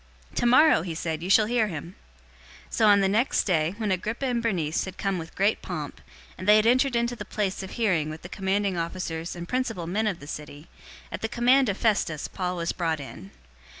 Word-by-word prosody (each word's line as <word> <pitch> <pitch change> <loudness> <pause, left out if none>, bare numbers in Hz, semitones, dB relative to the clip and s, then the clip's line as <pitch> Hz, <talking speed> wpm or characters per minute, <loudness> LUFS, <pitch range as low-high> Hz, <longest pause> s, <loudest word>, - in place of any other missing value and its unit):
"Tomorrow," 255 - +5
he 165 -1 -5
said, 160 -1 -3
"you 180 - -4
shall 215 +2 +6
hear 230 -1 +1
him." 170 -1 -7 0.8
025:023 - - -15
So 220 - +3
on 205 -1 +6
the 195 - +3
next 220 +7 +2
day, 170 -1 +1
when 215 -3 -1
Agrippa 215 +8 -2
and 245 -2 0
Bernice 175 -9 -1
had 190 0 -8
come 195 -2 -1
with 165 0 -9
great 200 +3 +1
pomp, 155 -5 -6 0.4
and 185 - -6
they 210 - +8
had 215 0 +4
entered 255 +2 +3
into 235 +1 0
the 210 - -6
place 200 -2 -2
of 190 - -7
hearing 180 -10 +1
with 155 +1 -8
the - - -7
commanding 195 0 -1
officers 165 -1 -4
and 175 0 -7
principal 235 -8 -2
men 210 +6 0
of 195 -5 -2
the 145 - -11
city, 150 +1 -8 0.4
at - - -5
the 225 - -2
command 245 +2 +3
of 200 - -1
Festus, 195 -9 0
Paul 180 -1 -3
was 170 0 -1
brought 165 -3 -1
in. 135 -8 -9
195 Hz, 215 wpm, -26 LUFS, 170-225 Hz, 0.8 s, they